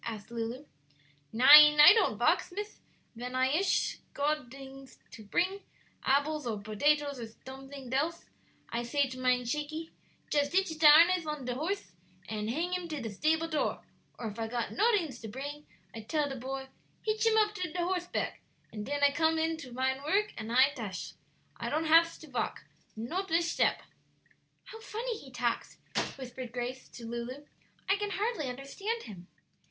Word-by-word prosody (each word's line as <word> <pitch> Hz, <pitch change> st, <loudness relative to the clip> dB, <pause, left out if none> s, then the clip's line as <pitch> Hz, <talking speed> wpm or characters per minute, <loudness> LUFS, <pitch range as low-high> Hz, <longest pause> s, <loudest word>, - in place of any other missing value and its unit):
said 220 Hz, -1 st, -7 dB
Lulu. 235 Hz, +4 st, -4 dB, 0.7 s
"Nein; 300 Hz, +5 st, +9 dB
I 295 Hz, +6 st, +11 dB
don't 450 Hz, -, +2 dB
valks, -, -, +2 dB
miss; 415 Hz, +3 st, -6 dB, 0.4 s
ven 250 Hz, +2 st, -6 dB
I 260 Hz, 0 st, +3 dB
ish 345 Hz, +8 st, +1 dB, 0.2 s
god 290 Hz, -2 st, -1 dB
dings 270 Hz, 0 st, -12 dB
to 220 Hz, -2 st, -12 dB
pring 365 Hz, -, 0 dB, 0.4 s
abbles 290 Hz, +1 st, +1 dB
or 220 Hz, -2 st, -2 dB
botatoes 285 Hz, +7 st, 0 dB
or 230 Hz, -, -5 dB, 0.2 s
some 265 Hz, +1 st, -9 dB
dings 270 Hz, -3 st, -8 dB
else 325 Hz, +5 st, -1 dB, 0.4 s
I 235 Hz, -, -2 dB
say 275 Hz, +4 st, +1 dB
to 255 Hz, 0 st, -8 dB
mine 250 Hz, -1 st, +2 dB
Shakey, 300 Hz, +5 st, -4 dB, 0.4 s
'Just 285 Hz, +1 st, +1 dB
hitch 380 Hz, 0 st, +2 dB
de 315 Hz, -1 st, +4 dB
harness 335 Hz, +2 st, +6 dB
on 300 Hz, -4 st, -4 dB
de 250 Hz, -, -2 dB
horse 310 Hz, -, -3 dB, 0.4 s
and 215 Hz, 0 st, -3 dB
hang 335 Hz, +9 st, -1 dB
him 360 Hz, -1 st, -2 dB
to 305 Hz, -3 st, -4 dB
de 225 Hz, -4 st, -5 dB
stable 315 Hz, +10 st, +1 dB
door;' 310 Hz, -2 st, -1 dB, 0.3 s
or 230 Hz, -2 st, -4 dB
if 210 Hz, +2 st, -10 dB
I 225 Hz, -, -2 dB
got 235 Hz, 0 st, -3 dB
nodings 390 Hz, -, +1 dB
to 220 Hz, -, -7 dB
pring 285 Hz, +6 st, -7 dB, 0.3 s
I 225 Hz, -, -7 dB
tells 290 Hz, +5 st, -1 dB
de 265 Hz, -, -7 dB
poy, 265 Hz, +1 st, -5 dB, 0.3 s
'Hitch 435 Hz, +1 st, +1 dB
him 440 Hz, -1 st, +4 dB
up 425 Hz, -1 st, +3 dB
a 355 Hz, -2 st, -3 dB
horseback;' 360 Hz, -1 st, -2 dB, 0.3 s
den 280 Hz, +7 st, -3 dB
I 285 Hz, -, +6 dB
comes 320 Hz, +2 st, +2 dB
in 325 Hz, 0 st, 0 dB
to 270 Hz, -6 st, -10 dB
mine 260 Hz, +2 st, -1 dB
vork 395 Hz, +9 st, +1 dB
and 220 Hz, +1 st, -6 dB
I 260 Hz, +3 st, +6 dB
tash! 210 Hz, -9 st, -6 dB, 0.4 s
I -, -, -4 dB
don't 310 Hz, +2 st, 0 dB
hafs 330 Hz, +1 st, +5 dB
to 315 Hz, -, -11 dB
valk 260 Hz, -4 st, -3 dB, 0.3 s
nod 340 Hz, -, -3 dB
a 325 Hz, -, +1 dB
shtep." 340 Hz, 0 st, +1 dB, 0.8 s
"How 445 Hz, -, -11 dB
funny 450 Hz, +1 st, -4 dB
he 275 Hz, -, -13 dB
talks," 240 Hz, -2 st, -2 dB, 0.4 s
whispered 255 Hz, -2 st, -7 dB
Grace 250 Hz, +2 st, -5 dB
to 235 Hz, -, -10 dB
Lulu; 240 Hz, +5 st, -6 dB, 0.4 s
"I 400 Hz, -, +3 dB
can 415 Hz, 0 st, -2 dB
hardly 405 Hz, -, -2 dB
understand 390 Hz, -, -4 dB
him." 180 Hz, -5 st, -11 dB
285 Hz, 175 wpm, -30 LUFS, 245-330 Hz, 0.8 s, I